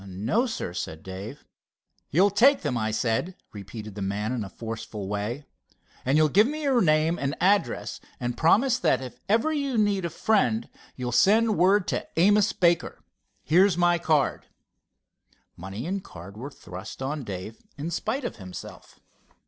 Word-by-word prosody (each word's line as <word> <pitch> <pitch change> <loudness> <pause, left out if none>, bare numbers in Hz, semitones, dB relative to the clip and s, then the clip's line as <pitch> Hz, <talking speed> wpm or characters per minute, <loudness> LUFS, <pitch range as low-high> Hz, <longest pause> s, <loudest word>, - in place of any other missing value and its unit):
"No, 110 - 0
sir," 220 - -4
began 80 -3 -5
Dave. 100 +9 -8 0.6
"You'll 190 +7 +4
take 255 +7 +4
them, 145 -5 -1
I 110 -2 0
said," 115 +11 -1 0.2
repeated 105 +1 -8
the 100 - -7
man 100 +3 -2
in 125 -4 -2
a 100 - -7
forceful 110 -3 -6
way. 105 +8 -3 0.6
"And 135 +4 +2
you'll 155 0 +5
give 205 +9 +4
me 305 +2 -4
your 265 -4 +3
name 155 0 +2
and 140 +2 -1
address, 190 - +1 0.2
and 120 -1 -2
promise 240 - +3
that 135 - +2
if 125 -2 -9
ever 230 +9 +2
you 280 -5 -1
need 205 -3 +2
a 170 - -1
friend 220 +5 +1 0.3
you'll 125 -1 -4
send 215 - +4
word 190 +1 +3
to - - -2
Amos 205 +4 +4
Baker. 170 -2 +1 0.4
Here's 180 +3 +4
my 175 -1 +3
card." 155 -4 +1 1.1
Money 95 +7 -7
and 190 +2 -3
card 95 +4 -11
were 125 +6 -7
thrust 95 -3 -9
on 145 +1 -3
Dave 100 +1 -7 0.2
in 155 +4 -4
spite 260 - -2
of - - -4
himself. 95 -3 -10
155 Hz, 165 wpm, -26 LUFS, -, 1.1 s, you'll